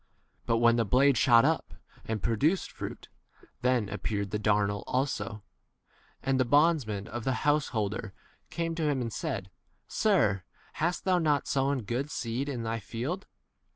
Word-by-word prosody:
But 115 - +3
when 120 0 +4
the 115 - +3
blade 130 +6 +4
shot 120 -2 +6
up 160 +1 0 0.3
and 110 -4 -3
pro 115 - +1
duced 160 - +1
fruit, - - -7 0.5
then 125 -4 +2
appeared 100 -1 -3
the 105 - -1
27 - - -11
darnel 100 -1 +2
also. 115 -6 -2 0.8
And 135 -1 +1
the - - +5
bondsmen 140 -7 +2
of 120 +1 -5
the 130 +3 -1
householder 115 -8 0 0.4
came 165 0 -2
to 160 -2 0
him 140 -2 0
and 115 -3 -3
said, 95 -1 -4 0.4
Sir, 110 - +2 0.3
hast 170 +3 -1
thou 185 -2 +3
not 150 -4 +1
sown 135 -2 +1
good 125 +7 -2
seed 125 +2 -3
in 125 -4 -3
thy 115 0 -2
field? 130 - -4
125 Hz, 160 wpm, -29 LUFS, 110-145 Hz, 0.8 s, shot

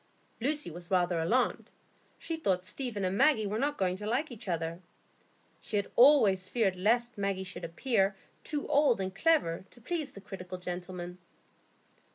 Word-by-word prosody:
Lucy 290 - -1
was 175 +2 -10
rather 175 -2 +2
alarmed; 235 +10 +1 0.5
she 330 - -4
thought 190 - 0
Stephen 215 -2 -3
and 185 +1 0
Maggie 220 -2 +4
were 210 +2 -2
not 290 +2 0
going 185 -1 +1
to 210 +1 -6
like 260 +6 0
each 225 -3 -9
other. 165 -1 -2 0.8
She - - -5
had 200 - -2
always 215 -9 +6
feared 210 -6 +1
lest 235 +4 +1
Maggie 195 -1 -1
should 190 -1 -7
appear 195 +3 +1 0.3
too 295 -1 -3
old 280 -6 +4
and 190 -1 -3
clever 290 - +2
to 240 - -15
please 310 +4 -3
that 200 -1 -12
critical 185 -2 -7
gentleman. 180 0 -6
200 Hz, 165 wpm, -31 LUFS, 180-245 Hz, 0.8 s, always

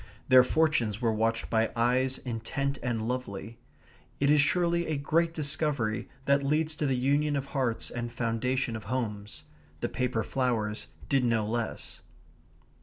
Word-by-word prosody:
Their 130 -1 +9
fortunes 125 -8 +1
were 115 -3 +1
watched 115 +1 0
by 110 0 +2
eyes 125 +3 +2
intent 135 +4 -3
and 115 -3 -2
lovely. 115 -2 -4 0.6
It 140 +1 +3
is 150 -1 +6
surely 170 +2 +2
a 155 - -1
great 165 +4 +1
discovery 145 -7 -1 0.2
that 140 0 +4
leads 155 +3 +1
to 150 - 0
the 130 -2 +1
union 145 +3 +2
of 140 -1 -1
hearts 130 -5 -1
and 120 -1 -4
foundation 120 +1 -1
of 110 - -7
homes. 105 -3 -4 0.4
The - - -2
paper 125 -3 -1
flowers 115 -5 -1 0.2
did 135 -2 +2
no 115 -3 +2
less. 115 +1 -4
125 Hz, 150 wpm, -29 LUFS, 115-140 Hz, 0.6 s, Their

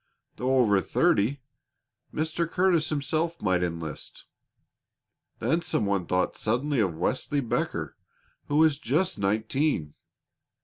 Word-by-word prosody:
Though 130 +1 +1
over 105 -6 +4
thirty, 125 +10 +1 0.7
Mr. 160 +2 -1
Curtis 175 -3 +2
himself 155 +3 -1
might 95 -3 +1
enlist. 85 -3 -5 1.1
Then 165 +2 +1
some 165 -10 -1
one 100 -3 0
thought 90 0 0
suddenly 125 +5 0
of 90 -7 0
Wesley 135 - 0
Becker, 120 -5 -2 0.5
who 145 - -1
was 155 -2 +4
just 160 - 0
nineteen. 110 - 0
130 Hz, 115 wpm, -27 LUFS, 100-155 Hz, 1.1 s, over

